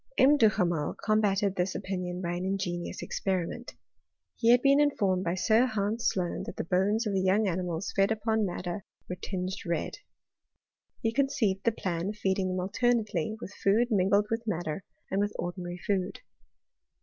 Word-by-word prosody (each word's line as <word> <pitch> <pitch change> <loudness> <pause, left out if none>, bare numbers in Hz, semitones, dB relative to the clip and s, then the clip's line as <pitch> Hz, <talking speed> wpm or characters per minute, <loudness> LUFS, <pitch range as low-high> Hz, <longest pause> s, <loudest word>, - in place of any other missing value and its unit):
M. 275 +3 +6
Duhamel 180 - +2
combated 205 -2 +2
this 180 +1 -1
opinion 180 -1 -3
by 170 - -1
an 175 +1 -3
ingenious 185 -2 -3
experiment. 190 +5 -3 0.6
He 230 - +2
had 245 +1 +6
been 275 +1 +5
informed 200 -11 +2
by 170 0 0
Sir 220 +6 +3
Hans 215 +1 0
Sloane 180 -2 -2
that - - -6
the - - -3
bones 195 +6 +1
of 210 - -1
young 190 +3 +3
animals 180 0 -2
fed 195 0 +4
upon 220 0 +1
madder 180 0 -3 0.2
were 180 - -4
tinged 185 0 -4
red. 170 -1 -2 1.1
He 225 0 +1
con 275 +2 +3
ceived 205 -8 0
the 230 - +5
plan 180 -4 -2
of 210 - -5
feeding 190 -2 0
them 185 0 -1
alternately 215 -1 0
with 190 - -8
food 225 +5 +2
mingled 200 +1 +3
with 225 0 0
madder, 175 -3 -2 0.3
and 195 +1 +1
with 205 0 -1
ordinary 175 0 -4
food. 190 +1 -2
195 Hz, 165 wpm, -29 LUFS, 180-220 Hz, 1.1 s, M